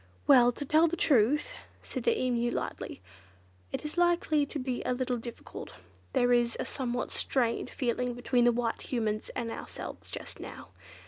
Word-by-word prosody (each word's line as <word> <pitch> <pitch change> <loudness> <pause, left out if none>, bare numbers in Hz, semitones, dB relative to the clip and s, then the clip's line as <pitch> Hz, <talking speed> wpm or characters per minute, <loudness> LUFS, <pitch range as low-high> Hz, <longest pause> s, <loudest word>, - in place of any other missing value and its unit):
"Well, 245 - +7
to 285 - -5
tell 315 +4 +5
the 345 +1 -2
truth," 270 +1 +3 0.3
said - - -5
the 465 -1 +3
Emu 240 -2 +1
lightly, 95 - -4 0.7
"it - - -4
is 300 +3 -2
likely 340 -4 +3
to 300 - -5
be 255 -2 -2
a - - 0
little 250 -1 -1
difficult. 235 0 -8 0.4
There 245 0 +4
is 240 -1 +2
a - - -1
somewhat 245 -2 -3
strained 245 -1 0
feeling 250 -1 -1
between 245 0 +2
the 240 - +6
White 235 -1 -1
Humans 220 -4 -2
and 230 -2 -2
ourselves - - -7
just - - -7
now. - - -9
245 Hz, 170 wpm, -30 LUFS, 240-285 Hz, 0.7 s, Well